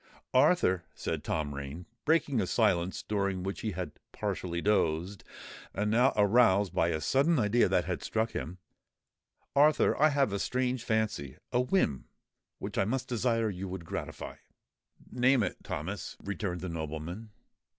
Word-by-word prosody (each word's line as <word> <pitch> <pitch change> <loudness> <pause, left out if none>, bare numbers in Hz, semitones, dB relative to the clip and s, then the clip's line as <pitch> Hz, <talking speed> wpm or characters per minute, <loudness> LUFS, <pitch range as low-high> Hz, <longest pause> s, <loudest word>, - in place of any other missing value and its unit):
"Arthur," 130 - +4
said - - -3
Tom 75 -2 -2
Rain, 70 +5 -6 0.2
breaking 145 -6 +2
a 95 - -1
silence 95 -5 +1
during 100 -3 -1
which 95 +1 -4
he 110 -3 -2
had 90 -3 -4 0.2
partially 85 -2 -3
dozed, 90 -1 0 0.5
and 105 +3 0
now 125 +4 +4
aroused 105 -3 +4
by 85 - +2
a 80 -2 0
sudden 140 - +2
idea 115 0 +3
that - - +2
had - - -3
struck 110 +1 -1
him,—"Arthur, 95 - -1
I 155 - +7
have 140 -7 +1
a 100 - -1
strange 125 0 -1
fancy—a 110 - -1
whim, 125 - +1 0.5
which - - -4
I - - +4
much 125 +5 -1
desire 115 -2 0
you 95 +1 -5
would 90 -2 -6
gratify——" - - -6 0.7
"Name 125 0 +3
it, - - -3
Thomas," 95 +8 -5
returned 100 -3 -3
the 95 - -4
nobleman. 85 +6 -5
100 Hz, 145 wpm, -30 LUFS, 90-120 Hz, 0.7 s, I